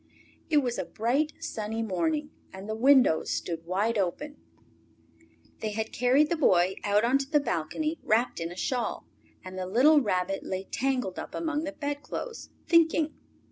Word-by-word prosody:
It 300 -3 +4
was 245 -2 -2
a - - -2
bright, 265 +8 0
sunny 220 +1 -3
morning, 295 - -1 0.2
and 190 +1 -9
the 215 - -2
windows 250 - +4
stood 165 -1 -3
wide 205 +5 0
open. 290 +11 -3 1.2
They 215 -1 -3
had 220 +1 -3
carried 260 +5 +3
the - - +3
Boy 185 - +3
out 205 +1 +2
on 255 +4 +3
to 270 0 -4
the 300 -1 +4
balcony, 300 - -2
wrapped 230 0 +1
in 165 0 -4
a - - -8
shawl, 245 +5 -2 0.4
and 185 0 -7
the 185 - -3
little 285 +10 +5
Rabbit 195 -3 -1
lay 190 0 -3
tangled 250 -4 -2
up - - -7
among 315 -1 -2
the 295 - -3
bedclothes, 290 +11 -5 0.2
thinking. 320 -2 +3
240 Hz, 165 wpm, -28 LUFS, 195-295 Hz, 1.2 s, little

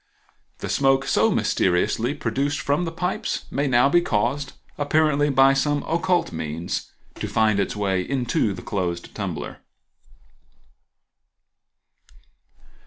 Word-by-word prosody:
The - - -5
smoke 135 -1 +2
so - - +3
mysteriously 105 +9 +1
produced 140 +2 -1
from 145 +5 0
the 165 - -3
pipes 180 +3 -3
may 140 +1 0
now 125 0 +4
be 175 +5 +4
caused, 135 +2 -1 0.2
apparently 145 0 +2
by 135 0 +5
some 145 +1 0
occult 175 +2 +1
means, 80 +1 -4 0.3
to - - -3
find 110 -2 +2
its 100 - -1
way 95 -3 0
into 120 -1 0
the - - -9
closed 90 -3 -3
tumbler. - - -5
135 Hz, 115 wpm, -23 LUFS, 105-145 Hz, 0.3 s, by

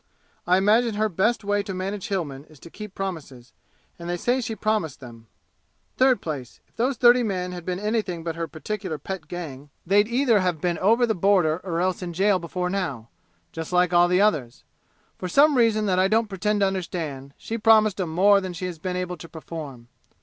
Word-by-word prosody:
I 180 +1 +5
imagine 215 +3 +3
her 215 +1 +1
best 210 +6 0
way 205 0 +1
to 195 -2 -6
manage 195 +2 -4
Hillmen 150 - -3
is 155 -3 -19
to 170 - -12
keep 210 -2 -9
promises, 150 -10 -6 0.5
and 170 0 -7
they 175 - -1
say 245 +8 0
she 225 -1 -4
promised 215 -8 -1
them. 115 -4 -12 0.7
Third 255 -4 +3
place, 140 -7 -6
if - - -38
those 255 +2 0
thirty 245 +1 +6
men 185 -5 -2
had 175 -2 -8
been 180 -1 -2
anything 210 -5 -2
but 165 -1 -3
her 165 0 -3
particular 185 0 -5
pet 170 +2 -7
gang 150 -5 -7 0.2
they'd 205 +4 +4
either 240 -2 +3
have 180 -4 0
been 175 +1 -1
over 230 +6 +4
the 225 - 0
border 180 -4 +2
or 170 -3 -2
else 185 0 -1
in 175 -1 -5
jail 195 +2 +2
before 180 +1 -3
now, 145 - -3 0.4
just 160 +1 -6
like 180 0 +2
all 175 0 +6
the 180 +2 +3
others. 150 - 0 0.6
For 185 - -3
some 285 - +4
reason 225 -3 +3
that 185 -2 +1
I 190 - +4
don't 220 +2 +1
pretend 205 +2 -1
to - - +5
understand, 160 -8 -4
she 230 +1 -5
promised 215 -3 +4
'em 175 - -2
more 200 +5 +4
than 185 -1 -5
she 175 +2 -5
has 175 -3 -6
been 180 +2 -3
able 180 -1 -3
to 165 +1 -11
perform. 150 -7 -8
185 Hz, 210 wpm, -24 LUFS, 165-210 Hz, 0.7 s, thirty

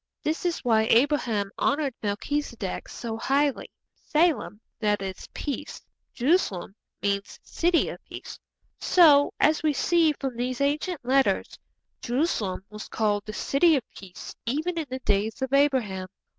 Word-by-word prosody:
This 315 +3 -2
is 340 -5 -3
why 220 -2 +3
Abraham 230 -6 +2
honoured 280 -1 +1
Melchizedek 220 0 -3
so 225 -2 -5
highly. 280 +3 0 0.2
'Salem 310 -9 0 0.2
that 210 -2 +1
is, 190 -1 -6
peace. 285 - -4 0.4
'Jeru 300 +9 +4
salem' 190 - -5 0.3
means 200 0 -2
city 340 0 +1
of - - -9
peace. - - -9 0.4
So, 300 -5 +6
as 310 +1 +3
we 310 -1 +2
see 325 +2 +3
from 270 -4 -5
these 250 +1 -2
ancient 290 +1 -1
letters, 270 +1 +2 0.5
Jerusalem 235 - -1
was 210 0 -8
called 210 -2 0
the 215 - -5
city 310 +8 +3
of 265 - 0
peace 185 -2 -10
even 315 +7 -1
in 310 - -4
the 260 +1 -5
days 210 0 0
of 265 +1 -3
Abraham. 250 -10 +2
260 Hz, 145 wpm, -26 LUFS, 210-300 Hz, 0.5 s, So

